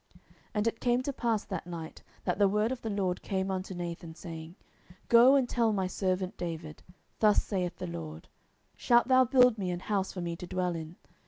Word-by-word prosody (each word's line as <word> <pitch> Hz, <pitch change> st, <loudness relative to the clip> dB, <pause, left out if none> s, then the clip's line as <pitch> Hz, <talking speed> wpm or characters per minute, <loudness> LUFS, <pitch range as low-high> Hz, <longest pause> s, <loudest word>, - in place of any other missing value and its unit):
10:007:004 -, -, -21 dB, 0.3 s
And 210 Hz, +1 st, +1 dB
it 230 Hz, 0 st, -1 dB
came 245 Hz, +1 st, +1 dB
to 280 Hz, -, -2 dB
pass 230 Hz, -4 st, 0 dB
that -, -, -5 dB
night, 165 Hz, -2 st, -7 dB, 0.2 s
that -, -, -1 dB
the 200 Hz, -, +6 dB
word 210 Hz, +4 st, +1 dB
of 260 Hz, -, -4 dB
the 225 Hz, -, -4 dB
LORD 190 Hz, -3 st, -1 dB
came 190 Hz, 0 st, -2 dB
unto 190 Hz, 0 st, -4 dB
Nathan, 170 Hz, -2 st, -6 dB
saying, 165 Hz, -1 st, -8 dB, 0.3 s
10:007:005 175 Hz, -, -17 dB
Go 240 Hz, +4 st, +7 dB
and 265 Hz, -3 st, +3 dB
tell 235 Hz, -2 st, +2 dB
my 190 Hz, -2 st, 0 dB
servant 185 Hz, 0 st, -2 dB
David, 165 Hz, -3 st, -6 dB, 0.4 s
Thus 210 Hz, -2 st, +4 dB
saith 180 Hz, -4 st, -2 dB
the -, -, -5 dB
LORD, 80 Hz, -2 st, -7 dB, 0.5 s
Shalt 240 Hz, +1 st, +3 dB
thou 260 Hz, 0 st, +6 dB
build 250 Hz, -2 st, +5 dB
me 185 Hz, -2 st, -2 dB
an 175 Hz, 0 st, -3 dB
house 195 Hz, -2 st, -1 dB
for 180 Hz, -, -6 dB
me 170 Hz, -1 st, -3 dB
to 180 Hz, -, -8 dB
dwell 180 Hz, -1 st, -1 dB
in? 160 Hz, +1 st, -7 dB
190 Hz, 215 wpm, -30 LUFS, 175-225 Hz, 0.5 s, Go